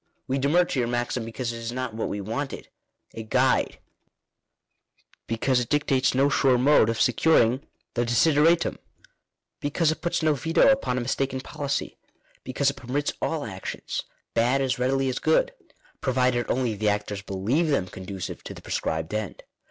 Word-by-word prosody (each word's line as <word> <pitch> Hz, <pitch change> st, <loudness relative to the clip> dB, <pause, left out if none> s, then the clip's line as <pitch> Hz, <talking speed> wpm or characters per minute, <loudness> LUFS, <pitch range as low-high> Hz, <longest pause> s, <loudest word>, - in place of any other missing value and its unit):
We 135 Hz, +1 st, 0 dB
demur 155 Hz, +6 st, +3 dB
to 140 Hz, -, -2 dB
your 120 Hz, -, +1 dB
maxim 120 Hz, 0 st, -1 dB
because 120 Hz, +1 st, -4 dB
it 115 Hz, -, -6 dB
is 115 Hz, 0 st, -4 dB
not 125 Hz, -2 st, -4 dB
what 110 Hz, -, -3 dB
we 100 Hz, -, -3 dB
wanted 125 Hz, +8 st, -4 dB, 0.2 s
— -, -, -39 dB
a 115 Hz, -, -6 dB
guide; 125 Hz, +4 st, +1 dB, 1.5 s
because 125 Hz, +3 st, +1 dB
it 120 Hz, -, -3 dB
dictates 135 Hz, -3 st, +2 dB
no 135 Hz, +2 st, +4 dB
sure 135 Hz, -3 st, +3 dB
mode 130 Hz, -3 st, +5 dB
of 115 Hz, -, -1 dB
securing 125 Hz, -1 st, +3 dB, 0.3 s
the 120 Hz, -, +1 dB
desideratum; 155 Hz, +7 st, +3 dB, 0.8 s
because 150 Hz, +2 st, +1 dB
it 160 Hz, -, -5 dB
puts 170 Hz, -1 st, -1 dB
no 155 Hz, -1 st, +4 dB
veto 160 Hz, +4 st, +3 dB
upon 270 Hz, -, 0 dB
a -, -, 0 dB
mistaken 130 Hz, +1 st, -1 dB
policy; 140 Hz, +1 st, -4 dB, 0.4 s
because 135 Hz, +2 st, +1 dB
it 140 Hz, -, -16 dB
permits 135 Hz, +3 st, -2 dB
all 160 Hz, -5 st, -1 dB
actions 95 Hz, -4 st, -5 dB, 0.3 s
bad, 125 Hz, +4 st, +2 dB
as 130 Hz, -2 st, 0 dB
readily 135 Hz, +1 st, +1 dB
as 130 Hz, -1 st, -1 dB
good— -, -, +2 dB, 0.5 s
provided 125 Hz, -2 st, +1 dB
only 125 Hz, -3 st, +1 dB
the 105 Hz, 0 st, 0 dB
actors 105 Hz, -1 st, -2 dB
believe 105 Hz, -, 0 dB
them 140 Hz, -11 st, +1 dB
conducive 95 Hz, 0 st, -7 dB
to -, -, -7 dB
the -, -, -11 dB
prescribed 80 Hz, +3 st, -2 dB
end. 110 Hz, -4 st, -4 dB
130 Hz, 165 wpm, -25 LUFS, 115-140 Hz, 1.5 s, mode